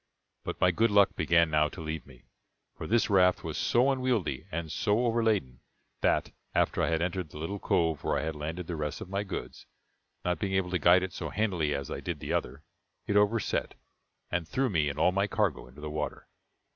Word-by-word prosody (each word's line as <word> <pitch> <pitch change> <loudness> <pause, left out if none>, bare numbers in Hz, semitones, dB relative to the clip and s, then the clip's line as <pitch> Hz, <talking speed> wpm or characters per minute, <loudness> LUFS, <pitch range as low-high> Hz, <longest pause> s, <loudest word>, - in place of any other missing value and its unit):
But - - -5
my 90 - +4
good 115 +6 +2
luck 100 -1 +4
began 85 0 +3
now 75 0 +3
to - - -11
leave 80 -1 -5
me; 65 -3 -16 0.5
for - - -6
this 115 +1 +3
raft 90 -3 +4
was - - -4
so 125 +3 +3
unwieldy, 125 - -1
and 80 -1 -4
so 110 +3 +1
overladen, 110 - +1 0.4
that, - - +2 0.2
after - - +2
I - - +2
had 80 0 +1
entered 90 -2 -2
the - - -11
little 85 +6 -4
cove 80 -5 +1
where - - +1
I - - -1
had 80 0 -3
landed 80 +4 -4
the 85 - -4
rest 75 -1 -3
of - - -7
my 100 +1 -1
goods, 90 -11 -6 0.6
not 90 -2 0
being 95 -1 -2
able 95 -2 0
to 90 - +1
guide 90 +4 +5
it 95 -2 -4
so - - -4
handily 90 -9 0
as 70 -2 -5
I - - -3
did - - -4
the - - -3
other, 70 +5 -2 0.4
it 100 - -1
overset, 105 +2 +1 0.6
and 85 -2 -1
threw 130 +2 0
me 75 -5 +2
and 70 - -5
all 85 +4 +4
my 100 +2 +1
cargo 90 - 0
into 65 +4 -14
the 75 0 -5
water. 75 -1 -4
90 Hz, 215 wpm, -29 LUFS, 75-100 Hz, 0.6 s, guide